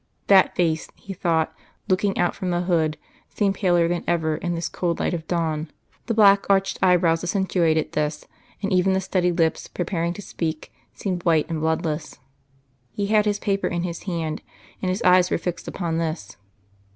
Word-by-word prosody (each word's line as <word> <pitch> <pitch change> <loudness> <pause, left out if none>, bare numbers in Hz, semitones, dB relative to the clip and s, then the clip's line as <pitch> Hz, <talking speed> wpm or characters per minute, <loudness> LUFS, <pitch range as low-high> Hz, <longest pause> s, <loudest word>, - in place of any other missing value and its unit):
That 195 -2 +5
face, 165 -3 0
he 195 - -8
thought, 165 -3 0 0.3
looking 195 +1 +1
out 175 - +2
from 185 - -4
the 175 0 0
hood, 165 -4 +1 0.3
seemed 200 -2 0
paler 175 -4 +2
than 175 0 -2
ever 160 -2 +1
in 175 -1 -2
this 170 - -2
cold 170 -2 -2
light - - 0
of 160 -2 -4
dawn; 160 -3 -1 0.4
the 230 - 0
black 200 -2 +5
arched 195 0 +2
eyebrows 175 -3 +3
accentuated 175 -4 +1
this, 150 0 -2 0.4
and 195 0 0
even 185 +1 +3
the 190 - +2
steady 185 -1 0
lips, 165 -2 0
preparing 170 -1 -2
to 205 - -8
speak, 160 -3 -4 0.2
seemed 180 -3 -4
white 160 -4 +3
and 160 - -1
bloodless. 160 -1 -2 0.7
He 200 - -2
had 210 -1 +4
His 205 -1 +1
paper 200 -1 -1
in 175 0 -2
His 170 -2 -4
hand, 165 -4 -3 0.4
and 185 - -1
His 190 +6 -2
eyes 180 0 +5
were - - +1
fixed 175 +1 -5
upon 165 -3 -2
this. 160 - -4
175 Hz, 180 wpm, -23 LUFS, 165-190 Hz, 0.7 s, That